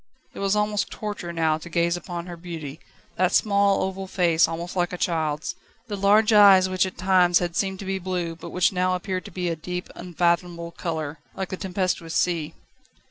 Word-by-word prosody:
It -, -, -9 dB
was 195 Hz, +1 st, +1 dB
almost 210 Hz, 0 st, 0 dB
torture 205 Hz, -5 st, -5 dB
now 160 Hz, -2 st, +1 dB
to 170 Hz, -, -10 dB
gaze 170 Hz, +1 st, +1 dB
upon 175 Hz, -1 st, -6 dB
her 175 Hz, -1 st, -7 dB
beauty 165 Hz, -4 st, -7 dB, 0.4 s
that 185 Hz, 0 st, +2 dB
small, 200 Hz, -1 st, +3 dB
oval 190 Hz, 0 st, -4 dB
face, 170 Hz, -3 st, +3 dB
almost 170 Hz, +2 st, -5 dB
like 175 Hz, -1 st, 0 dB
a 180 Hz, -, -4 dB
child's, 160 Hz, -3 st, -1 dB, 0.4 s
the 205 Hz, -, -2 dB
large 210 Hz, +3 st, +4 dB
eyes 195 Hz, -3 st, +8 dB
which 185 Hz, 0 st, +1 dB
at 185 Hz, -, -9 dB
times 180 Hz, -1 st, +4 dB
had 175 Hz, -1 st, -2 dB
seemed 190 Hz, 0 st, 0 dB
to 195 Hz, -, -8 dB
be 190 Hz, 0 st, -2 dB
blue 175 Hz, -2 st, -3 dB
but 165 Hz, -, -9 dB
which 180 Hz, +1 st, +2 dB
now 185 Hz, 0 st, +1 dB
appeared 185 Hz, 0 st, -4 dB
to -, -, -9 dB
be 180 Hz, -1 st, -3 dB
a 165 Hz, -, -1 dB
deep, 180 Hz, +3 st, -5 dB
unfathomable 175 Hz, -1 st, -1 dB
colour, 160 Hz, -3 st, -4 dB, 0.2 s
like 190 Hz, -1 st, -4 dB
the -, -, -3 dB
tempestuous 180 Hz, -3 st, -2 dB
sea. 170 Hz, -4 st, 0 dB
180 Hz, 195 wpm, -24 LUFS, 170-190 Hz, 0.4 s, eyes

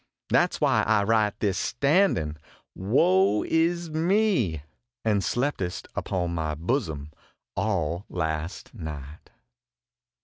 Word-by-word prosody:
That -, -, +3 dB
s -, -, -8 dB
why -, -, +3 dB
I 105 Hz, -2 st, +2 dB
write 105 Hz, -1 st, +2 dB
this 100 Hz, -3 st, +1 dB
standin 140 Hz, -, +2 dB, 0.4 s
woe 95 Hz, 0 st, +3 dB
is 170 Hz, 0 st, +1 dB
me! 165 Hz, -, +1 dB, 0.4 s
And 105 Hz, -3 st, +2 dB
slept 140 Hz, +4 st, 0 dB
st 90 Hz, -2 st, -4 dB
upon 85 Hz, -2 st, -2 dB
my 80 Hz, -2 st, -2 dB
bosom 80 Hz, -, -2 dB, 0.4 s
all 90 Hz, -4 st, -1 dB
last 80 Hz, 0 st, -3 dB
night. 75 Hz, -, -8 dB
100 Hz, 110 wpm, -26 LUFS, 80-130 Hz, 0.4 s, That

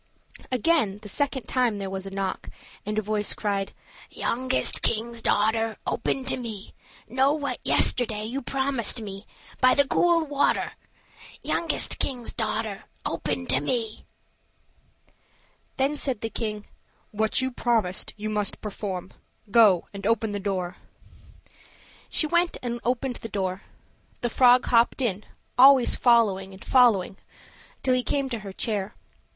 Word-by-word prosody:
Again, 255 Hz, -5 st, +2 dB
the -, -, -8 dB
second 265 Hz, +4 st, 0 dB
time 245 Hz, -5 st, +1 dB
there 195 Hz, -1 st, -4 dB
was 190 Hz, 0 st, -5 dB
a -, -, -5 dB
knock, 195 Hz, -1 st, -4 dB, 0.4 s
and 210 Hz, 0 st, -2 dB
a 215 Hz, -, +1 dB
voice 210 Hz, 0 st, -1 dB
cried: 200 Hz, -2 st, -2 dB, 0.4 s
"Youngest 255 Hz, +2 st, 0 dB
king's 230 Hz, +1 st, -1 dB
daughter, 220 Hz, +1 st, +1 dB
Open 265 Hz, -, -2 dB
to 260 Hz, -, +4 dB
me; 225 Hz, -5 st, -7 dB, 0.3 s
Know 265 Hz, +4 st, +2 dB
you -, -, -5 dB
what 285 Hz, -, -3 dB
yesterday 220 Hz, -4 st, +2 dB
You 255 Hz, +5 st, -4 dB
promised 265 Hz, -3 st, 0 dB
me, 200 Hz, -1 st, -8 dB, 0.3 s
By 255 Hz, 0 st, +5 dB
the 280 Hz, -1 st, +5 dB
cool 340 Hz, 0 st, +3 dB
water? 285 Hz, -1 st, 0 dB, 0.7 s
Youngest 335 Hz, -, +1 dB
king's 245 Hz, -4 st, 0 dB
daughter, 215 Hz, -2 st, -3 dB, 0.2 s
Open 85 Hz, -, -2 dB
to 130 Hz, -, +4 dB
me." 220 Hz, -, -3 dB, 1.7 s
Then 275 Hz, +3 st, +1 dB
said 265 Hz, -6 st, -3 dB
the 225 Hz, -, -4 dB
king, 210 Hz, -2 st, -4 dB, 0.5 s
"What 220 Hz, +1 st, 0 dB
you 260 Hz, 0 st, -1 dB
promised 220 Hz, -6 st, -1 dB
you 215 Hz, +1 st, -4 dB
must 210 Hz, -1 st, 0 dB
perform. 195 Hz, -3 st, -5 dB, 0.4 s
Go 205 Hz, -7 st, +5 dB
and 200 Hz, 0 st, -4 dB
open 225 Hz, -1 st, +1 dB
the 205 Hz, -, -3 dB
door." 190 Hz, -3 st, -3 dB, 1.3 s
She -, -, +3 dB
went 345 Hz, +2 st, +1 dB
and 240 Hz, -1 st, -3 dB
opened 250 Hz, +1 st, -1 dB
the 225 Hz, -, -8 dB
door; 190 Hz, -2 st, -3 dB, 0.6 s
the 240 Hz, -, -1 dB
frog 250 Hz, 0 st, +5 dB
hopped 235 Hz, +2 st, +3 dB
in, 215 Hz, -6 st, -1 dB, 0.3 s
always 265 Hz, -1 st, +7 dB
following 200 Hz, -6 st, +2 dB
and 190 Hz, -, -13 dB
following 225 Hz, -8 st, +3 dB
her -, -, -31 dB, 0.6 s
till 260 Hz, -, +3 dB
he 255 Hz, -, +2 dB
came 275 Hz, +2 st, -1 dB
up 265 Hz, -, -7 dB
to 235 Hz, -, -2 dB
her 200 Hz, -2 st, -8 dB
chair. 205 Hz, 0 st, -3 dB
225 Hz, 145 wpm, -25 LUFS, 205-255 Hz, 1.7 s, always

